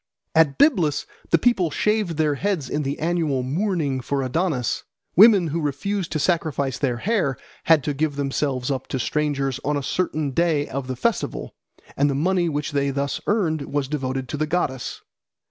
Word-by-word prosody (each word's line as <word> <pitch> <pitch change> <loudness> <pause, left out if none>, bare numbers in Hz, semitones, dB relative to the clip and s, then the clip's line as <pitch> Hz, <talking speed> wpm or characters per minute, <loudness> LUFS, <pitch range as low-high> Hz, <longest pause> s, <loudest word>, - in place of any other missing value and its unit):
At 160 -4 +4
Byblus 180 - +3 0.2
the 170 - +5
people 190 -4 +2
shaved 210 -2 0
their 155 -2 +2
heads 160 -3 -2
in 150 - 0
the 140 0 -2
annual 160 -5 0
mourning 150 -2 -1
for 135 +2 -1
Adonis. 130 -2 -1 0.3
Women 200 -4 +7
who 165 +3 -2
refused 165 +6 -2
to - - +1
sacrifice 140 -5 0
their 125 -4 0
hair 185 - 0 0.3
had 160 -4 +5
to 150 -1 -1
give 145 +1 -1
themselves 135 -2 -1
up 130 -2 -3
to 130 - -3
strangers 140 -1 -1
on 145 +1 0
a 140 - -3
certain 155 -2 -1
day 155 -1 +1
of 135 -1 -4
the 130 - -3
festival, 125 - -2 0.4
and 145 +1 +2
the 140 - 0
money 175 +3 +1
which 150 -1 -2
they 140 -1 +1
thus 140 0 -2
earned 165 -9 0
was 145 -2 0
devoted 135 -2 -3
to - - -3
the 155 +1 0
goddess. 145 -6 -2
150 Hz, 180 wpm, -23 LUFS, 135-170 Hz, 0.4 s, Women